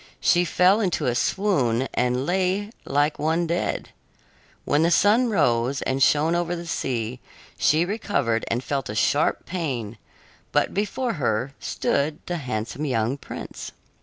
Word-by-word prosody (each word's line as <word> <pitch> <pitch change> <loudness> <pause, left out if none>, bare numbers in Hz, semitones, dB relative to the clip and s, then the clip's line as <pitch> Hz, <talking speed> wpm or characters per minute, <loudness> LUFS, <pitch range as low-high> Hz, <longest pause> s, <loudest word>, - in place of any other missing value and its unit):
She 175 0 +3
fell 185 +5 +4
into 180 -6 0
a 125 - +2
swoon 130 - +1
and 125 +1 0
lay 190 +4 0
like 145 +1 +1
one 160 +3 +1
dead. 170 +1 -2 0.8
When 145 - +2
the 165 - +4
sun 210 +8 +4
rose 135 - +1
and 135 +1 -1
shone 150 +4 +4
over 175 0 0
the 170 0 -7
sea, 125 -6 -2 0.4
she 160 +3 +3
recovered 160 - -1
and 120 +2 -1
felt 135 -4 -2
a 105 - -4
sharp 145 +7 +1
pain, 130 - -4 0.5
but - - +1
before 220 +5 -1
her 120 +3 0
stood 150 +2 -1
the 175 - -2
handsome 125 0 -4
young 120 -2 0
prince. 140 - -8
150 Hz, 145 wpm, -24 LUFS, 125-175 Hz, 0.8 s, fell